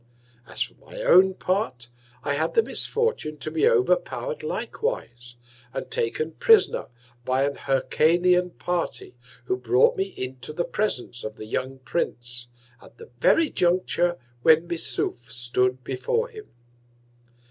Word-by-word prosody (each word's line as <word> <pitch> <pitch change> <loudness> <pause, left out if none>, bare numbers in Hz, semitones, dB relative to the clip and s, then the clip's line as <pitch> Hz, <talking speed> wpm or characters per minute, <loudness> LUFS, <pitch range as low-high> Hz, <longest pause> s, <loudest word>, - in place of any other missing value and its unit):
As - - +2
for - - -9
my - - -8
own 190 - +6
Part, 130 - -2 0.3
I 140 - 0
had 155 +3 -1
the 455 - +5
Misfortune 450 - -1
to 155 - -4
be 430 - +3
over 470 -2 +4
power'd - - -5
likewise, 120 - -4 0.4
and - - -5
taken 155 +7 -1
Prisoner 440 - +4 0.4
by 130 +2 +1
an 140 - -1
Hyrcanian 175 +7 +2
Party, 175 -7 -3 0.3
who 125 - 0
brought 125 0 +3
me 190 - 0
into 130 +3 -5
the 175 +2 -1
Presence 125 - -2
of 110 0 -5
the 110 - -8
young 130 +4 -3
Prince, 120 -3 -3 0.3
at - - -17
the 460 +1 -13
very 325 -1 +4
Juncture 175 -1 +1 0.2
when 160 +4 +5
Missouf 130 -7 -3
stood 125 +1 0
before 460 - -1
him. 435 -3 -11
155 Hz, 135 wpm, -25 LUFS, 125-200 Hz, 0.4 s, own